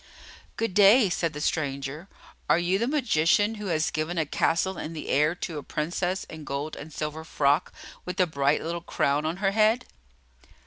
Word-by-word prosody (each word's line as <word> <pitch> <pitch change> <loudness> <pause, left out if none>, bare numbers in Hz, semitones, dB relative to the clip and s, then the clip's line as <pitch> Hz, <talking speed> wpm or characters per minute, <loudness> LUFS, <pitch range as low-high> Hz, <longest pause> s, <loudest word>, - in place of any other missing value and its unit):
"Good 225 -4 -1
day," 205 +1 +6
said 165 -2 -1
the 150 - -6
stranger. 140 +2 -2 0.4
"Are - - +5
you 175 +3 +1
the 235 - 0
magician 215 - +2
who 205 - -4
has 160 -3 0
given 155 +3 -2
a 160 - +1
castle 180 +5 0
in 160 - -5
the 155 - -7
air 150 +4 +2
to 165 -3 -5
a - - -7
Princess 175 +6 -2
in 160 -1 -10
a - - -9
gold 145 +2 -4
and 155 - -9
silver 155 +1 -4
frock 145 0 +1 0.3
with 180 +1 -6
a 185 - +5
bright 140 -3 +1
little 170 +1 -3
crown 150 -2 0
on 165 +3 -2
her 195 - +4
head?" 220 +3 +3
165 Hz, 190 wpm, -26 LUFS, 150-190 Hz, 0.4 s, day